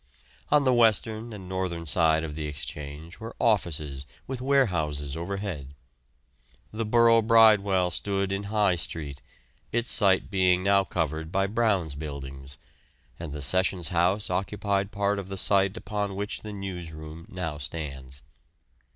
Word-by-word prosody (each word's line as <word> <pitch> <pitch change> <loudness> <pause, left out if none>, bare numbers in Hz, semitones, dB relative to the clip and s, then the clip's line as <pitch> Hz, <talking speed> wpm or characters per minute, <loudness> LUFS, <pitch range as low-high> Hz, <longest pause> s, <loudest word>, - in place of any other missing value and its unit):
On 150 -1 +5
the 130 -2 +3
western 115 0 +2
and 100 -4 -8
northern 90 -3 -3
side 80 0 +3
of 80 -2 -4
the 75 0 -4
Exchange 75 +3 -7
were 115 +1 -8
offices 75 - 0 0.2
with 130 -1 -5
warehouses 85 - +1
overhead. 85 -5 -5 1.0
The 110 +1 -2
Borough 115 0 +5
Bridewell 105 -5 +5
stood 100 0 -1
in 100 +1 -2
High 105 -2 +2
Street, 75 -4 -5 0.5
its 120 +1 +1
site 95 -4 +3
being 90 -2 +3
now 100 0 +4
covered 80 -2 -2
by 95 +1 +2
Brown's 100 -7 +1
Buildings, 70 -2 -7 0.6
and 85 -3 -6
the 75 -1 -5
Sessions 95 +2 +1
House 90 +3 +1
occupied 100 +1 -1
part 100 0 0
of 95 -1 -7
the 95 - -4
site 100 +2 +2
upon 105 -3 -3
which 100 +1 -3
the 105 - -7
newsroom 85 -5 -7
now 80 -5 -4
stands. 70 -2 -7
95 Hz, 140 wpm, -27 LUFS, 80-105 Hz, 1.0 s, On